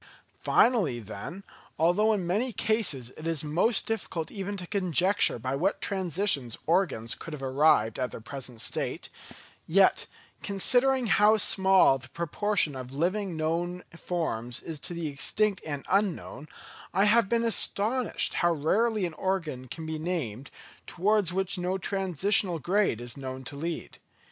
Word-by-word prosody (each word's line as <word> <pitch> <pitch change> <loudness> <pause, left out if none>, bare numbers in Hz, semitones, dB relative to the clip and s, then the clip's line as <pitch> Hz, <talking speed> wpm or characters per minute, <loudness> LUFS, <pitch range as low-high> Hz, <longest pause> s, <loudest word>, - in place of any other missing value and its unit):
Finally, 195 - +2
then, 120 - -8 0.3
although 175 +7 +3
in 200 -5 -1
many 215 +9 0
cases 205 - 0
it 155 - -6
is 165 -3 -1
most 175 +9 +1
difficult 190 -7 -3
even 200 0 -5
to 180 - -6
conjecture 185 - +2
by 130 +3 -3
what 185 +8 0
transitions 185 - -1
organs 160 -10 +1
could 165 - -9
have 140 -2 -7
arrived 135 -4 +2
at 125 -1 -1
their - - -8
present 125 -1 -6
state; - - -2 0.6
yet, 190 +3 +3 0.3
considering 245 +6 +3
how 210 +1 +4
small 190 -9 +4
the 130 0 -11
proportion 170 0 0
of 130 -1 -7
living 185 +8 -1
and 165 - -6
known 170 +3 -2
forms 125 -10 -3
is 160 -3 -7
to 175 - -4
the 170 -1 -4
extinct 190 +8 0
and 145 -2 -5
unknown, 190 -6 -1 0.5
I 195 - +4
have 210 0 +4
been 235 +1 +1
astonished 230 +2 +1
how 175 -1 +2
rarely 210 +7 +1
an 170 - -4
organ 160 -8 -3
can 160 +6 -7
be 160 0 -4
named, 140 - -4 0.4
towards 200 0 +1
which 190 0 -1
no 180 +2 -1
transitional 195 0 +1
grade 185 - +1
is 120 +2 -5
known 130 -1 -6
to 135 - -6
lead. 165 +3 -5
175 Hz, 150 wpm, -28 LUFS, 145-200 Hz, 0.6 s, how